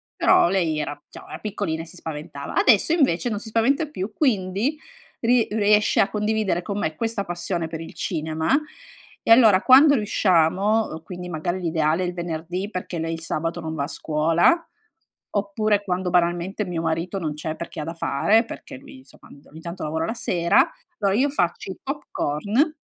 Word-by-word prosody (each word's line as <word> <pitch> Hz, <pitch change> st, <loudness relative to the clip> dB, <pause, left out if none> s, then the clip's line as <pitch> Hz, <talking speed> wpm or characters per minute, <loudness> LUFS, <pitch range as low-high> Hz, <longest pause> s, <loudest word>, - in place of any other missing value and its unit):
però -, -, +4 dB
lei 170 Hz, -5 st, 0 dB
era 145 Hz, -1 st, -4 dB
diciamo -, -, -12 dB
era -, -, -6 dB
piccolina 165 Hz, -6 st, -3 dB
e -, -, -11 dB
si 180 Hz, -, -14 dB
spaventava. 150 Hz, -3 st, -7 dB
Adesso 235 Hz, +5 st, +4 dB
invece 260 Hz, -, +2 dB
non 210 Hz, -3 st, -2 dB
si 220 Hz, -, -9 dB
spaventa 245 Hz, +8 st, +2 dB
più, 210 Hz, -8 st, -5 dB
quindi 215 Hz, +1 st, 0 dB, 0.4 s
ri 240 Hz, 0 st, +3 dB
riesce 210 Hz, 0 st, +3 dB
a 195 Hz, -, +4 dB
condividere 210 Hz, -4 st, 0 dB
con 200 Hz, +2 st, -3 dB
me 155 Hz, -5 st, -2 dB
questa 225 Hz, +1 st, -2 dB
passione 175 Hz, -1 st, -3 dB
per 160 Hz, 0 st, -6 dB
il 165 Hz, -, -9 dB
cinema 160 Hz, -, -1 dB, 0.6 s
e -, -, 0 dB
allora 220 Hz, -5 st, +7 dB
quando 280 Hz, +4 st, +7 dB
riusciamo 195 Hz, -, +1 dB
quindi 180 Hz, +1 st, -8 dB
magari 175 Hz, +2 st, -3 dB
l'ideale 160 Hz, 0 st, +1 dB
è -, -, 0 dB
il 175 Hz, -, -4 dB
venerdì 175 Hz, +3 st, -4 dB
perché 185 Hz, -4 st, -5 dB
lei 165 Hz, 0 st, -2 dB
il 165 Hz, -, -6 dB
sabato 165 Hz, +1 st, -3 dB
non 160 Hz, -1 st, -5 dB
va 140 Hz, -, -1 dB
a -, -, -3 dB
scuola, 165 Hz, -, +2 dB, 0.6 s
oppure 205 Hz, +1 st, 0 dB
quando 185 Hz, -1 st, -2 dB
banalmente 175 Hz, +3 st, +1 dB
mio 175 Hz, -3 st, -3 dB
marito 165 Hz, +4 st, -2 dB
non 155 Hz, -4 st, -3 dB
c'è 155 Hz, +1 st, -5 dB
perché 170 Hz, -2 st, -6 dB
ha -, -, -3 dB
da 165 Hz, +2 st, -5 dB
fare, 205 Hz, -, +2 dB
perché 275 Hz, +4 st, -9 dB
lui, 275 Hz, 0 st, -13 dB
insomma, 260 Hz, -, -19 dB
un 140 Hz, -, -16 dB
do -, -, -22 dB
ogni 160 Hz, -, -12 dB
tanto 170 Hz, +2 st, -7 dB
lavora 160 Hz, +1 st, -2 dB
la 225 Hz, -, -2 dB
sera. 190 Hz, -, +2 dB, 0.3 s
Allora 195 Hz, -1 st, +1 dB
io 275 Hz, +4 st, +3 dB
faccio 190 Hz, -7 st, -1 dB
i -, -, -9 dB
pop 285 Hz, +2 st, -4 dB
corn 210 Hz, -, 0 dB
185 Hz, 190 wpm, -23 LUFS, 165-220 Hz, 0.6 s, allora